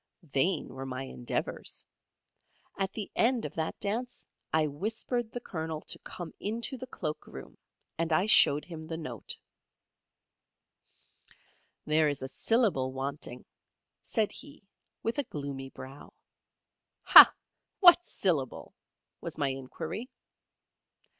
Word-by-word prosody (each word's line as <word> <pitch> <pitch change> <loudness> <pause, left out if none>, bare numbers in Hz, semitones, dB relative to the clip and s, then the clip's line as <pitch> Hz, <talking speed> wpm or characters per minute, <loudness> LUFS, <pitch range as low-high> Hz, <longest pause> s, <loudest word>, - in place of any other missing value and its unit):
Vain 160 +4 0
were 135 0 -6
my 130 0 -4
endeavours. 65 - -3 0.9
At 195 -1 -1
the 210 -1 -6
end 240 0 +2
of - - -5
that 160 -1 -3
dance 240 +5 -3 0.3
I 160 -1 +3
whispered 220 - -3
the 245 - -4
Colonel 160 -7 -4
to - - -4
come 175 -3 -8
into 230 +6 -2
the 255 0 -8
cloak 155 -10 -5
room, - - -10 0.4
and 165 0 0
I 180 +5 +3
showed 150 -8 +6
him 160 -3 -8
the 160 0 -4
note. 125 - -4 2.5
"There 155 0 +3
is 140 -2 -3
a - - -3
syllable 190 - +1
wanting," 135 -1 -4 0.6
said 220 -3 0
he, 285 -4 -9 0.4
with 230 +5 -1
a - - +1
gloomy 140 -2 -5
brow. 135 +2 -11 0.9
"Hah! - - +11 0.5
What 355 -2 +8
syllable?" 160 - -1 0.5
was - - -5
my 140 -2 +1
inquiry. 135 - -5
160 Hz, 120 wpm, -30 LUFS, 140-225 Hz, 2.5 s, Hah